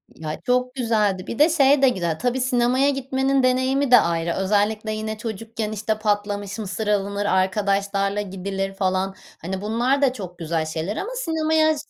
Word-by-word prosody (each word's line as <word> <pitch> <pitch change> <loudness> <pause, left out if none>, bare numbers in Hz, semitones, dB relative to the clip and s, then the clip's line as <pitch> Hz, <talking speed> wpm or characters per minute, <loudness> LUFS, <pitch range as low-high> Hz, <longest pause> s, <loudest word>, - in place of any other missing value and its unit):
Ya, 155 -1 -6
çok 250 0 +1
güzeldi 215 -7 0
bir 235 - -5
de, 310 +3 +6
şey 285 -3 +4
de 265 - +6
güzel 170 -7 -2
tabii, 250 +1 0
sinemaya 255 +2 +2
gitmenin 270 0 0
deneyimi 260 +1 +2
de 245 - +9
ayrı, 170 0 0
özellikle, 210 +2 0
yine 215 0 -4
çocukken, 220 0 -5
işte, 215 +1 -2
patlamış 205 -1 -1
mısır 210 +1 -4
alınır, 200 0 0
arkadaşlarla 200 +1 +1
gidilir, 195 0 -4
falan, 190 0 -1 0.3
hani, 190 +3 -4
bunlar 240 +6 +1
da 260 -2 +3
çok 180 -7 -8
güzel 160 -1 -1
şeyler 160 +6 -4
ama 445 - -4
sinemaya 315 -6 +1
215 Hz, 160 wpm, -23 LUFS, 195-255 Hz, 0.3 s, de